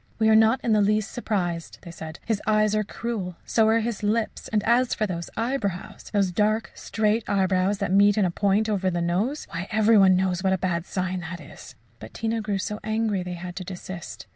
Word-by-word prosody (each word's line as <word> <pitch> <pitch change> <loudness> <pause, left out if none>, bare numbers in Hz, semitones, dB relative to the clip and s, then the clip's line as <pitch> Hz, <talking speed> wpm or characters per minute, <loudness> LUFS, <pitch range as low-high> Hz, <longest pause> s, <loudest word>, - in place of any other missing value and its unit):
"We 220 -1 +3
are 220 - +6
not 220 +3 +5
in 230 - +2
the 210 - +4
least 210 +1 +1
surprised," 175 -8 -3
they 170 - -9
said; 160 0 -8
"his 220 -3 -1
eyes 215 -1 +3
are 215 0 +1
cruel 205 -4 -4
so 220 -1 +3
are 225 +1 +3
his 230 -1 -3
lips; 215 +2 -1
and 210 -2 0
as 240 +2 +2
for 215 - 0
his 170 -4 -4
eyebrows 225 -7 -3
those 200 -3 +1
dark, 215 +4 +1
straight 220 +1 0
eyebrows 190 0 +2
that 180 - -2
meet 205 +1 +5
in 205 - +3
a 180 - 0
point 200 +4 +1
over 195 -3 0
the 175 -1 -2
nose 190 - -1
why, 175 +3 -4
every 215 0 +4
one 190 -1 +6
knows 185 -1 0
what 190 0 +2
a - - +1
bad 175 -1 -2
sign 185 0 -2
that 175 0 -6
is!" 145 - -12 0.2
But 110 - -11
Tina 225 0 -1
grew 210 -2 -1
so 210 +2 -4
angry 215 -2 0
they 180 0 -5
had 175 0 -7
to 185 - -4
desist. 185 -1 -8
205 Hz, 220 wpm, -25 LUFS, 185-220 Hz, 0.2 s, are